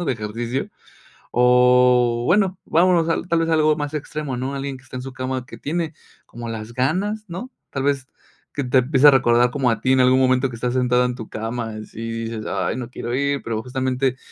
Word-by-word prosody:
¿no? - - -2
De 135 - +2
ejercicio. 115 +4 -4 0.6
O 125 -1 +4
bueno, 190 +2 +2
vámonos 170 0 +3
a 165 - +1
tal 170 -2 0
vez 165 - 0
algo 155 -1 +3
más 145 0 -4
extremo, 150 -2 -4
¿no? 130 +3 -3
Alguien 140 0 -4
que 130 - -19
está 130 0 -9
en - - -5
su 135 0 -8
cama 130 0 -3
que - - -11
tiene 165 +1 -3 0.3
como 120 0 -8
las 110 0 -6
ganas, 185 - -1
¿no? 210 +10 -6 0.2
Tal 135 - -3
vez 140 -2 0 0.5
que 145 - -2
te 125 +1 +4
empiece 135 +2 +4
a - - +10
recordar 125 -2 +4
como 130 -2 +1
a 115 - -1
ti 130 +4 +2
en 130 - +4
algún 130 +1 +4
momento 130 0 +3
que 120 - -8
estás 120 +1 -2
sentado 125 -1 +2
en 125 -1 -2
tu 110 -3 -9
cama, 115 +1 -4
y - - -7
así 110 - -10 0.2
dices: 115 -1 -5
"Ay - - -1
no 125 -1 -5
quiero 120 -1 -4
ir", 140 +1 0
pero 110 -2 -3
justamente, 130 0 -1
130 Hz, 220 wpm, -21 LUFS, 120-145 Hz, 0.6 s, a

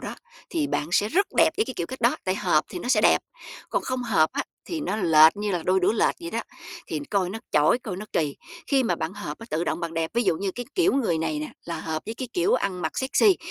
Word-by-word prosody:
đó - - -6 0.4
thì 315 -6 0
bạn 150 - -2
sẽ 205 +3 +3
rất 395 - +2
đẹp - - +6
với 435 - +2
cái 260 - -6
kiểu 170 - -2
cách 260 - -8
đó, 235 +1 +3
tại 185 - +1
hợp 180 -6 +2
thì 180 - -6
nó 210 - -5
sẽ 240 -5 +4
đẹp. - - +5 0.5
Còn - - 0
không 255 -1 -2
hợp 195 -10 +3
á - - -1 0.2
thì 330 -3 -3
nó 210 -6 -2
lệch 160 -3 +6
như 210 0 -2
là 175 -3 -1
đôi 185 +2 +2
đũa 180 - +3
lệch 225 - +2
vậy 170 - -6
đó, 230 - -1 0.5
thì 155 - -3
coi 185 -3 +1
nó 220 - -5
chỏi, 150 +11 +4
coi 210 -8 -6
nó 210 - -7
kỳ. 150 -3 0 0.3
Khi 275 -2 +3
mà 235 - +1
bạn 160 +2 -3
hợp 205 - -6
á, 230 - -10
tự 165 +2 0
động - - -2
bạn 165 -1 -4
đẹp, 165 0 -1
ví 240 - +2
dụ 190 -7 +2
như 195 +3 -2
cái 245 +3 -6
kiểu 365 +1 +3
người 220 -12 +1
này 160 -1 -1
nè 150 - -5
là 170 -2 -4
hợp 160 -1 -3
với 220 - -4
cái 255 +1 -5
kiểu 380 +6 +2
ăn 185 - -1
mặc - - -1
sexy, 310 +9 +4
200 Hz, 280 wpm, -25 LUFS, 165-245 Hz, 0.5 s, đẹp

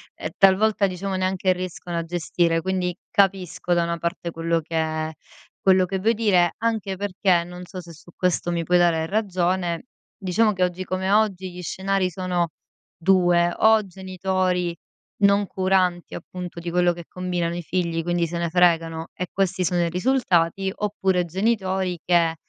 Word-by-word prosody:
ehm, - - -5
talvolta 200 +2 +4
diciamo 190 +1 -3
neanche 185 0 +1
riescono 180 -1 -5
a 170 - -1
gestire. 165 0 0
Quindi, 185 -1 -1 0.2
capisco 190 -4 +1
da 170 - +2
una 170 0 -2
parte, 170 +1 -3
quello 165 0 0
che 160 0 -2 0.5
quello 185 -1 +4
che 190 +1 -3
vuoi 225 +4 +2
dire. 195 -6 +2
Anche 220 -4 -2
perché, 185 -3 +1
non 180 +1 -9
so 185 - -8
se 170 -1 -12
su 165 +2 -16
questo 180 -1 0
mi 170 -1 -1
puoi 180 +2 +3
dare 165 -2 +3
ragione, 180 -1 -1 0.3
diciamo 205 +3 +2
che 185 -3 0
oggi 180 +1 -1
come 185 +1 -2
oggi 195 -3 +1
gli 180 - -8
scenari 190 +1 -1
sono 180 -1 -1 0.5
2: 175 -1 +3
o 220 0 +5
genitori 185 -1 -2 0.4
non 200 0 +4
curanti, 185 -2 0
appunto, 180 0 -7
di 170 0 -5
quello 175 0 +2
che 170 -1 -10
combinano 175 -2 -2
i 175 - -5
figli. 170 -1 -1
Quindi, 175 0 0
se 170 +1 -4
ne 170 -1 -1
fregano 165 -2 +2
e 180 - -3
questi 190 -1 0
sono 175 +1 +1
i 170 - +1
risultati, 190 -3 +1
oppure 190 -3 0
genitori 190 -1 -1
che, 170 -2 +3
180 Hz, 165 wpm, -23 LUFS, 170-190 Hz, 0.5 s, o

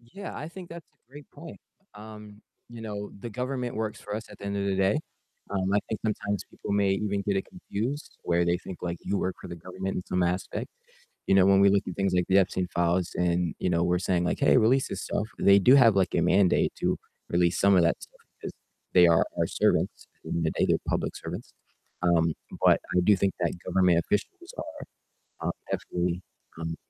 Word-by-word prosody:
Yeah, 155 +13 -9
I 150 - -6
think 180 0 -10
that's 170 -1 -10
a 120 - -44
great 145 +1 -13
point, 160 +3 -11 0.4
um, 105 0 -11 0.3
you 120 -1 -10
know, 105 -2 -5
the 115 - -6
government 125 +1 -3
works 110 -1 -3
for 105 - -6
us 110 +1 -4
at - - -13
the - - -10
end 100 0 -2
of 100 - -1
the 100 - +1
day. 95 +8 +2 0.5
Um, 95 -1 -1
I - - +5
think 110 - -3
sometimes 100 -2 -2
people - - -6
may 100 -1 +2
even 100 0 -1
get 100 -1 +1
it 95 - -1
confused 145 - -5
where 85 0 +1
they 85 0 +2
think, 90 0 -9
like, 85 -1 -2
you 100 - -1
work 95 - -2
for - - -9
the 85 - -7
government 95 +3 -5
in 90 - -2
some 90 - 0
aspect, 90 +2 -2 0.6
you - - +4
know, 95 - +6
when 95 0 +5
we 100 0 +6
look 100 0 +3
at 90 - -5
things 100 -2 0
like 90 -1 +2
the 95 - +4
Epstein 95 -1 +1
files 85 +1 +1
and, 85 -1 0
you 90 - 0
know, 85 -1 +1
we're 90 +1 +2
saying 90 -1 0
like, 90 - -1
"Hey, 140 - +5
release 130 +3 +3
this - - -4
stuff," 105 - -2
they 100 0 +6
do 125 +7 +6
have, 115 -6 +6
like, 95 -2 +2
a - - +2
mandate 90 +2 +3
to - - 0 0.3
release 85 0 +2
some 100 0 +5
of 90 - +6
that 85 - +1
stuff - - -16 0.2
because - - -6 0.4
they 90 -1 +7
are 85 -1 +4
our - - +2
servants, - - 0
at - - -41
the - - -9
end - - -1
of - - -1
the 80 - +1
day, - - +1
they're - - +3
public - - -1
servants. - - -7 0.5
Um, 85 -2 +3 0.3
but - - +6 0.2
I - - +5
do 105 +2 +5
think 95 0 0
that 85 -2 0
government 90 -3 +3
officials 350 - -3
are, - - -9 0.4
um, - - +2 0.2
definitely, 90 0 -2 0.4
um, 80 0 -3
95 Hz, 230 wpm, -27 LUFS, 90-110 Hz, 0.6 s, they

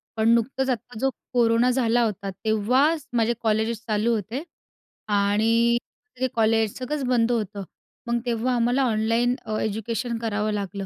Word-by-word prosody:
पण 220 +1 +2
नुकतंच 265 +3 0
आत्ता 245 -1 -3
जो 270 - +2 0.2
कोरोना 235 0 +3
झाला 240 -2 +2
होता, 200 -3 -2 0.2
तेव्हाच 255 +9 +2
माझे 230 0 +2
कॉलेजेस 220 0 0
चालू 220 +2 +1
होते 225 - -4 0.6
आणि 220 +3 +3 0.4
ते 260 - +1
कॉलेज 220 -1 +2
सगळंच 275 +2 -3
बंद 240 -2 +2
होतं. 210 -4 -2 0.4
मग 235 0 +1
तेव्हा 240 +1 0
आम्हाला 245 +3 +2
ऑनलाईन 230 +1 +1
अ, 215 - -2
एज्युकेशन 225 +3 -2
करावं 215 -1 -1
लागलं. 200 -1 -4
230 Hz, 145 wpm, -24 LUFS, 215-245 Hz, 0.6 s, कोरोना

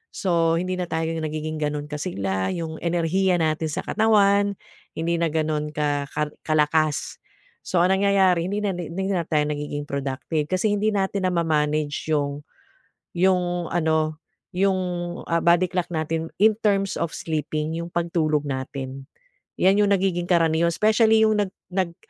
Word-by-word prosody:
So 165 -3 +2
hindi 185 +1 -2
na 180 - -2
tayo 160 0 -1
nagiging 155 0 -3
ganun 150 -1 -2
kasigla 100 - -2
yung 160 -2 -5
enerhiya 175 +2 +1
natin 160 0 0
sa - - -3
katawan 205 -2 +3 0.4
hindi 165 +1 0
na 170 - +2
ganun 155 -1 -1
ka 145 -1 0
ka 150 0 -2
kalakas 155 0 +1 0.5
so 180 - +1
ang 190 +2 +4
nangyayari 190 -3 +3
hindi 200 +2 -2
na, 205 - +1
hindi 180 +3 -3
na 175 -4 -1
tayo 150 -2 +2
nagiging 145 0 -3
productive 140 +2 -2
kasi 185 +5 +1
hindi 210 +2 0
natin 195 -1 0
na 180 - -1
ma 170 - +2
manage 150 -1 0
yung 145 -1 -1 0.7
yung 175 -1 +1
ano 160 -2 +1 0.4
yung, 190 0 +2 0.5
ah, 170 0 +2
body 175 +1 +4
clock 180 -1 -2
natin 160 0 -2
in 215 0 +5
terms 195 -2 +1
of 170 - -2
sleeping 155 0 -3
yung 170 +1 -5
pagtulog 160 -3 0
natin 135 0 -5 0.5
yan 195 +2 +4
yung 205 -1 +3
nagiging 180 -2 -1
karaniwan 170 -1 +3
specially 220 +1 +4
yung 215 -1 +3
nag 200 -2 0 0.2
nag 180 -2 -1
165 Hz, 155 wpm, -24 LUFS, 155-185 Hz, 0.7 s, in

